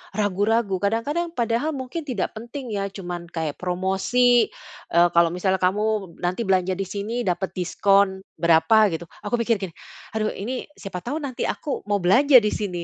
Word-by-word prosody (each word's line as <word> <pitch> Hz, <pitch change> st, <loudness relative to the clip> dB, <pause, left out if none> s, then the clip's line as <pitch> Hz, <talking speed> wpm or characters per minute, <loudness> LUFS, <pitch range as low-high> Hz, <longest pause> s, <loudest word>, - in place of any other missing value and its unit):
ragu-ragu. 205 Hz, 0 st, +1 dB
Kadang-kadang 230 Hz, -, 0 dB
padahal 240 Hz, +6 st, 0 dB
mungkin 265 Hz, +5 st, -5 dB
tidak 235 Hz, -8 st, -2 dB
penting 240 Hz, +2 st, -7 dB
ya, 200 Hz, 0 st, -1 dB
cuman 175 Hz, -3 st, -6 dB
kayak 160 Hz, -3 st, -3 dB
promosi, 190 Hz, +7 st, +2 dB, 0.4 s
eee, 170 Hz, +1 st, +5 dB
kalau 170 Hz, -1 st, +5 dB
misalnya 190 Hz, +1 st, 0 dB
kamu 205 Hz, -1 st, 0 dB
nanti 180 Hz, +6 st, -1 dB
belanja 185 Hz, -1 st, +1 dB
di 195 Hz, -, -2 dB
sini 210 Hz, +5 st, -3 dB
dapat 185 Hz, -1 st, -2 dB
diskon, 190 Hz, +1 st, +2 dB, 0.2 s
berapa 170 Hz, +5 st, +4 dB
gitu. 165 Hz, +1 st, -5 dB, 0.2 s
Aku 210 Hz, +3 st, 0 dB
pikir 230 Hz, 0 st, +2 dB
gini, 185 Hz, -, -4 dB, 0.4 s
"Aduh 215 Hz, -1 st, -1 dB
ini, 245 Hz, +6 st, -4 dB
siapa 195 Hz, -3 st, -6 dB
tahu 285 Hz, +6 st, -3 dB
nanti 260 Hz, -3 st, -3 dB
aku 290 Hz, -, -3 dB
mau 205 Hz, -1 st, +1 dB
belanja 265 Hz, +10 st, +5 dB
di 210 Hz, -, +1 dB
sini," 180 Hz, -5 st, -3 dB
200 Hz, 165 wpm, -23 LUFS, 180-235 Hz, 0.4 s, eee